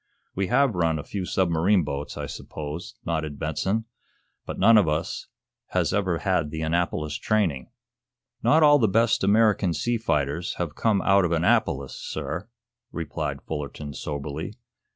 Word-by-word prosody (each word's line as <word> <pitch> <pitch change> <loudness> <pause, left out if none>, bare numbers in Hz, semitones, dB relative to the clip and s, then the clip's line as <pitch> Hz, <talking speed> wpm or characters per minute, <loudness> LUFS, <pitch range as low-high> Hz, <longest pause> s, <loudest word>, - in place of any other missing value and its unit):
"We 95 0 -1
have 135 +2 +3
run 85 -3 +1
a 75 - -5
few 95 -3 -4
submarine 90 +1 +2
boats, 70 0 -5
I - - -3
suppose," 80 +10 -7
nodded 80 -3 -2
Benson. 95 +9 -1 0.6
"But - - -5
none 115 - +6
of 105 -6 +5
us 75 +2 -2 0.4
has - - 0
ever 95 -4 +1
had 90 -4 0
the 80 +1 -4
Annapolis 80 -2 -1
training." 95 -11 0 0.7
"Not 160 +1 +4
all 145 -1 +7
of - - -2
the 110 - +5
best 115 +2 +2
American 100 -3 +3
sea 120 +7 0
fighters 75 -3 -1
have 85 -4 -3
come 105 -1 +1
out 100 0 +4
of 85 - 0
Annapolis, 80 -5 +1
sir," 80 - -5 0.4
replied 85 -3 -4
Fullerton, 75 -1 -5
soberly. 75 +6 -5
85 Hz, 150 wpm, -25 LUFS, 75-105 Hz, 0.7 s, all